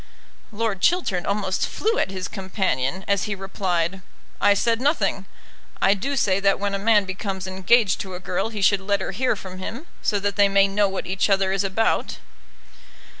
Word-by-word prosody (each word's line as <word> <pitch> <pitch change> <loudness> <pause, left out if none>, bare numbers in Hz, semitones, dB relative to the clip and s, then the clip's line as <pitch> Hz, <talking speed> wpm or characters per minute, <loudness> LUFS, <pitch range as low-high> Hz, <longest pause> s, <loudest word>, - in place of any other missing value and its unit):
Lord 215 -3 -2
Chiltern 335 - +1
almost 200 -2 0
flew 450 +2 0
at - - 0
his 190 -1 -4
companion, 190 - -2
as 200 -2 +1
he 210 -2 -2
replied, 190 -2 -2 0.4
"I 205 0 +5
said 230 +3 +1
nothing. 290 +4 0 0.5
I 195 - +4
do 270 +8 -3
say 195 -7 +2
that 195 0 +2
when 200 0 -2
a 195 - -1
man 210 -1 +3
becomes 190 0 -4
engaged 190 +3 +2
to 190 -2 -6
a - - -6
girl, 185 +3 -2
he 210 -3 -4
should 195 0 +4
let 200 +1 0
her - - -3
hear 250 +5 0
from 185 -2 -9
him, 235 - -6 0.2
so 205 - +1
that 200 0 -2
they 200 -1 +5
may 195 0 +4
know 200 0 +1
what 190 - -4
each 190 +2 0
other 195 -1 +2
is 195 0 0
about." 195 +3 0
195 Hz, 190 wpm, -23 LUFS, 190-210 Hz, 0.5 s, I